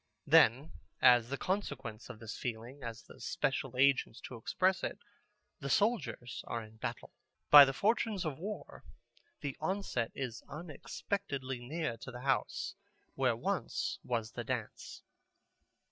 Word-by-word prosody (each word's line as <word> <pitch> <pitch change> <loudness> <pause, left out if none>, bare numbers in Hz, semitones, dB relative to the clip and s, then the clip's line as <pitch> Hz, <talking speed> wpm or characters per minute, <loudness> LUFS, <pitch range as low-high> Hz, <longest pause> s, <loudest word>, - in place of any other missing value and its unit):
Then 145 -2 +5 0.3
as 120 -1 +6
the 140 - -2
consequence 135 - -3
of - - -7
this 110 -1 -7
feeling, 120 +4 -5
as 115 -2 -6
the - - -15
special 130 +2 -1
agents 130 -3 +3
to 125 - -8
express 185 +11 +1
it, - - -2 0.6
the - - -4
soldiers 210 - 0
are 115 -1 -3
in 110 0 -14
battle. - - -5 0.4
By 145 -1 +13
the 135 - -1
fortunes 210 - +1
of 150 -3 -3
war 205 +4 -6 0.6
the 140 -2 -3
onset 160 - -1
is 125 -4 -4
unexpectedly 145 -3 -4
near 125 -1 -3
to 115 - -9
the 125 0 -8
house 135 0 0 0.4
where - - +2
once - - -2
was 115 -2 -2
the - - -5
dance. - - -5
135 Hz, 140 wpm, -34 LUFS, 120-160 Hz, 0.6 s, By